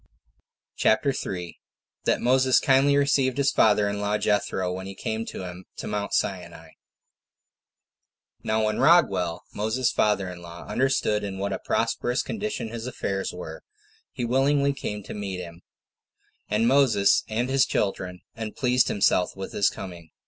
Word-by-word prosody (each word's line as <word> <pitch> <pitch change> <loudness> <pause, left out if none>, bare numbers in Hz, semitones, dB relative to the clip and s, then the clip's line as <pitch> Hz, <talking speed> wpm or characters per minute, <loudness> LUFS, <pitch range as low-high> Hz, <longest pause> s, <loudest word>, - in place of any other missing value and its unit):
CHAPTER 120 +6 +3
3. 90 -7 -5 0.5
That - - +2
Moses 130 +1 +4
Kindly 140 +1 +4
Received 140 -2 +2
His 140 -1 +2
Father 105 -1 +4
In 100 0 -3
Law, 105 +1 0
Jethro, 95 -3 0
When 95 +1 -6
He 95 - -8
Came 110 +3 -3
To - - -6
Him 90 0 -8
To - - -6
Mount 105 -1 -2
Sinai. 85 -4 -3 1.7
Now 110 0 +1
when 110 0 -1
Raguel, 100 - +3
Moses's 110 +4 0
father 105 -3 +1
in 90 -1 -8
law, 85 0 -10
understood 120 -5 +1
in 100 -1 -4
what 100 +1 -2
a - - -3
prosperous 125 +1 0
condition 215 - -4
his 115 +1 -6
affairs 100 -6 -3
were, 90 0 -8 0.5
he 125 - -3
willingly 140 +3 +2
came 105 -6 -5
to - - -8
meet 100 -3 -4
him 85 -1 -9 0.9
and 110 +2 +2
Moses 120 -7 +4
and 115 +3 -1
his 135 0 +3
children, 90 -3 -2
and 110 -1 -6
pleased 125 -1 +2
himself 90 -2 +2
with 95 0 -7
his 100 - +3
coming. 85 -4 -9
105 Hz, 155 wpm, -25 LUFS, 95-130 Hz, 1.7 s, Moses